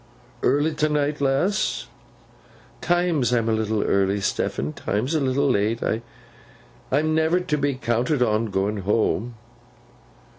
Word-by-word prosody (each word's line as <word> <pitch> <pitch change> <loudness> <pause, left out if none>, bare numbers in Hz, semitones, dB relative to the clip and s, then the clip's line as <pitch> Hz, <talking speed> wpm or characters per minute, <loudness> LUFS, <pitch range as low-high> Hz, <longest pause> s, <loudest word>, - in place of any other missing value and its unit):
'Early 145 +4 +2
t'night, 150 -1 0
lass?' 140 +10 0 1.0
''Times 175 -7 +1
I'm 115 -1 0
a - - +2
little 110 -1 0
early, 100 +1 +1
Stephen! 75 -6 -2
'times 115 +9 -2
a 160 - +2
little 140 +1 +1
late. 110 +2 0 1.1
I'm 155 +4 +2
never 160 +3 +2
to 155 -4 -1
be 140 -1 0
counted 125 +2 0
on, 110 0 +1
going 100 +1 -1
home. 110 +3 0
130 Hz, 120 wpm, -23 LUFS, 110-150 Hz, 1.1 s, Early